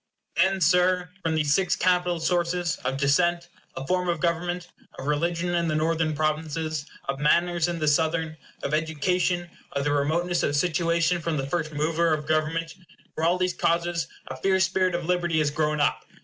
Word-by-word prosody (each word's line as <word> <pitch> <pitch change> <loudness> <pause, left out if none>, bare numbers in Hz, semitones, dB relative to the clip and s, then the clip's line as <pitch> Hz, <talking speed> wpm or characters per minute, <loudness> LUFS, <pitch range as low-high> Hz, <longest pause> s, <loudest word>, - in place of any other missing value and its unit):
Then, 190 +2 +2
Sir, 180 +1 +3
from 160 -3 0
these 150 -2 +2
six 190 +2 +2
capital 180 -1 +1
sources 175 0 0
of 135 - -3
descent, 170 +5 +2 0.3
of 135 - -6
form 180 -1 0
of 170 -2 0
government, 175 +1 -1 0.3
of 130 - -7
religion 170 +4 0
in 170 -1 +1
the 155 - 0
Northern 160 0 0
Provinces, 155 0 -2 0.2
of 135 0 -2
manners 170 +3 +2
in 175 -1 -2
the 155 -2 -1
Southern, 160 +1 +1 0.3
of 145 - -2
education, 175 +3 0 0.3
of 140 - -1
the 145 - 0
remoteness 165 +5 +1
of 145 - 0
situation 170 +1 +1
from 165 -1 -1
the 135 - -2
first 155 +1 -2
mover 160 +2 +1
of 150 -1 -7
government 160 +1 0 0.4
from 160 +1 0
all 175 +2 +2
these 180 0 0
causes 170 0 0 0.2
a - - -6
fierce 190 -1 +2
spirit 185 -1 +1
of 175 -1 -3
liberty 175 -2 0
has 150 -2 +2
grown 150 0 0
up. 145 - +1
165 Hz, 180 wpm, -25 LUFS, 155-175 Hz, 0.4 s, Sir